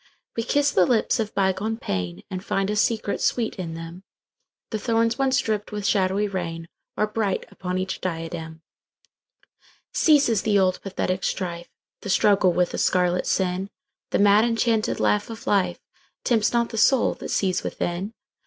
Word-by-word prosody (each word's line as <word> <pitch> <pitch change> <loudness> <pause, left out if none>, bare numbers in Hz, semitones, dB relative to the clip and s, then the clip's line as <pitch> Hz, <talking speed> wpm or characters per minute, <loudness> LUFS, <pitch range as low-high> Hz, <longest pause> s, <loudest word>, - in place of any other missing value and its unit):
We 230 - 0
kiss 285 +4 +2
the 185 -7 +4
lips 240 +1 +2
of 215 -1 -3
bygone 195 +3 0
painAnd 90 - -4
find 195 +1 -1
a - - -1
secret 215 -1 0
sweet 230 -3 0
in 170 -3 -5
them:The 170 +5 -10
thorns 230 +2 +1
once 265 -1 +2
dripped 210 -4 -2
with 210 -1 -4
shadowy 200 0 +2
rainAre 175 +3 -5
bright 205 -4 -1
upon 180 -1 -4
each 185 0 -3
diadem. 165 -2 -5 1.3
Ceases 280 - +4
the 210 -2 +2
old 185 -1 +2
pathetic 190 -1 -2
strife, 175 -2 -3 0.3
The 205 - -6
struggle 195 -1 +4
with 180 0 +1
the - - -4
scarlet 180 -1 +1
sin:The 195 +9 -3
mad 205 +1 +5
enchanted 230 -1 +1
laugh 210 +1 +1
of 225 0 -8
lifeTempts 205 +3 -1
not 235 -1 +1
the 225 - -3
soul 260 +3 +4
that - - -8
sees 185 -2 +1
within. 185 +6 -3
200 Hz, 145 wpm, -24 LUFS, 180-225 Hz, 1.3 s, mad